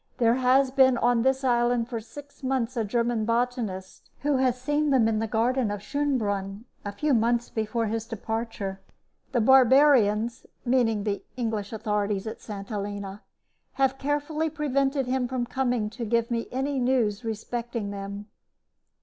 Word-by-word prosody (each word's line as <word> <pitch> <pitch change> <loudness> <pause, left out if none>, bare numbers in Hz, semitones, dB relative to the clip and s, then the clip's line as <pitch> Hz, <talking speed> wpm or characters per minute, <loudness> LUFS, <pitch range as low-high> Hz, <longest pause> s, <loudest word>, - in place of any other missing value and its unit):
There 230 -1 +4
has 260 +1 +3
been 260 -2 +5
on 240 0 +2
this 265 +2 +1
island 240 -2 +2
for 235 -2 -4
six 280 +6 -12
months 260 -2 -1
a 230 - 0
German 235 +1 0
botanist, 230 -5 -2
who 290 -1 +1
has 255 -1 +1
seen 295 +3 0
them 255 -5 +4
in 220 -1 +1
the 225 - -1
garden 235 +2 +1
of 205 0 -4
Schoenbrunn 210 -7 -2 0.2
a 205 - -4
few 295 +7 0
months 235 +1 +1
before 220 +1 -1
his 225 +1 -3
departure. 220 -3 -4 0.5
The 245 -3 +1
barbarians 245 -3 +4 0.2
(meaning 235 -4 +2
the 205 -1 -2
English 220 -4 -2
authorities 210 -2 -1
at 220 - -6
St. 200 -2 -7
Helena) 205 -1 -5 0.5
have 270 0 +1
carefully 295 +3 -1
prevented 275 -2 0
him 255 0 0
from 250 -1 -2
coming 245 -3 -1
to 235 +1 -6
give 230 +1 0
me 230 -1 -1
any 270 +2 -1
news 245 -4 +1
respecting 230 -1 -4
them." 200 +1 -6
235 Hz, 155 wpm, -26 LUFS, 215-260 Hz, 0.5 s, been